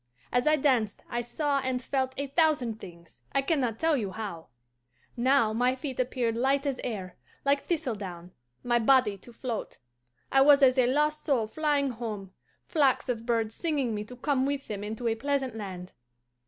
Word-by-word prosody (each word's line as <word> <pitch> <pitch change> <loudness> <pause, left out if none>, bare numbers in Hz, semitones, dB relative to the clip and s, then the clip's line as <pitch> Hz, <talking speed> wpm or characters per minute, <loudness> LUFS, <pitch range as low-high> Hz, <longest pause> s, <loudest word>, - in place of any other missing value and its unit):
As 245 +3 +1
I 305 - +6
danced 255 -8 +1
I 240 - 0
saw 280 +4 -1
and 260 -1 -1
felt 260 0 -2
a 280 - -1
thousand 280 -6 +1
things, 170 -8 -13
I 275 - +2
can 315 +1 +1
not 235 -4 -1
tell 325 +2 +2
you 215 -7 -1
how. 190 -4 -6 0.7
Now 245 -2 +3
my 250 +3 +2
feet 265 -1 -6
appeared 245 -2 0
light 270 +4 +1
as 275 -3 -2
air, 190 -7 -5 0.3
like 280 0 +2
thistledown, 200 - -3 0.3
my 240 -1 +2
body 245 -3 +4
to 240 - -12
float. 235 -2 -5 0.5
I 270 - +5
was 285 0 +7
as 255 0 +5
a 245 - +4
lost 300 +3 +1
soul 255 -7 +1
flying 285 +2 0
home, 215 -5 -6 0.3
flocks 275 -6 +2
of 230 -1 -3
birds 225 -2 0
singing 285 -8 -1
me 210 0 -3
to 250 - -10
come 265 +1 0
with 280 -1 -3
them 205 -1 -5
into 220 +3 -4
a 225 - +2
pleasant 265 +1 -1
land. 185 -4 -7
250 Hz, 180 wpm, -28 LUFS, 220-280 Hz, 0.7 s, was